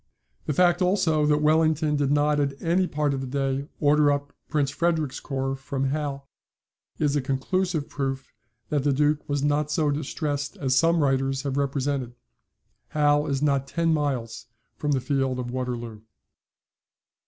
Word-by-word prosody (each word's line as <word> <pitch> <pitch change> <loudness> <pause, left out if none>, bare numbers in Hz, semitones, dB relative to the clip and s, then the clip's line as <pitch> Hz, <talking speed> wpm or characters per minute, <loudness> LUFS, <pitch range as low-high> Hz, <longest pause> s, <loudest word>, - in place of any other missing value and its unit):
The 150 - +1
fact, 175 +3 +3
also, 165 -5 +2
that 150 0 +2
Wellington 155 0 +3
did 145 -2 +1
not 145 +1 +2
at 140 -1 -1
any 180 +3 +1
part 150 -2 0
of 135 - -3
the 135 - -4
day 135 +1 -1
order 145 0 +4
up 145 0 -3 0.2
Prince 145 -3 +1
Frederick's 160 -3 0
corps 135 -1 -2
from 135 0 -2
Hal, 140 -2 -3 0.7
is 145 -1 +1
a 145 - +2
conclusive 155 +4 -1
proof 135 -1 -4 0.4
that 145 -3 0
the 145 -1 +2
Duke 150 +2 +1
was 145 -1 0
not 145 0 +1
so 150 -1 +1
distressed 145 +2 -3
as 135 -7 0
some 165 +2 +3
writers 135 0 +1
have 140 -2 -2
represented. 140 -3 -1 0.7
Hal 145 0 +2
is 140 0 -1
not 140 -2 +1
ten 165 +3 +1
miles 130 -7 -2 0.3
from 145 -1 -1
the 130 - +1
field 135 -1 0
of 125 -1 -4
Waterloo. 120 -4 -4
145 Hz, 160 wpm, -25 LUFS, 135-150 Hz, 0.7 s, order